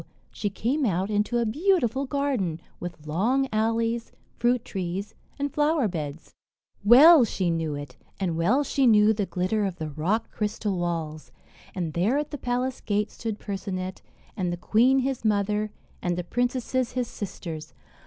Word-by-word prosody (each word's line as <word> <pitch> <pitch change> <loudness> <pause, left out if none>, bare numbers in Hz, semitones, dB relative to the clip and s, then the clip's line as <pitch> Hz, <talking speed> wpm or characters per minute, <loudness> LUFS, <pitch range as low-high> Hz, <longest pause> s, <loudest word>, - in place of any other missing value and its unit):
she 205 - -2
came 250 +9 -1
out 195 -2 0
into 210 +3 +1
a 235 - +1
beautiful 275 - +1
garden, 255 - -1 0.2
with 175 -4 -7
long 230 - +1
alleys, 230 +1 0 0.2
fruit 240 0 +1
trees, 190 +1 -4 0.2
and 285 -1 -2
flower 295 -4 +2
beds. 155 -4 -6 0.5
Well 275 +7 +9
she 190 -5 0
knew 160 -3 -1
it, 145 -3 -8 0.2
and 180 -4 -1
well 210 - +2
she 275 -2 +2
knew 215 -1 +6
the 205 -2 -2
glitter 190 +4 0
of 190 -3 -1
the 155 -3 -5
rock 185 +10 -1
crystal 210 -2 -2
walls. 165 -3 -3 0.4
And 170 -4 -2
there, 205 +11 +2
at 295 0 -2
the 290 - -5
palace 250 +1 -2
gate, 210 0 -1
stood 225 -3 -4
Percinet, 190 -2 -5 0.3
and 180 -3 -1
the 175 - -3
queen, 240 +9 +3
his 265 -2 -2
mother, 210 0 +1 0.3
and 175 -1 -1
the 180 - -2
princesses, 245 +4 -1
his 250 -1 -1
sisters. 170 -7 -7
210 Hz, 160 wpm, -26 LUFS, 180-250 Hz, 0.5 s, Well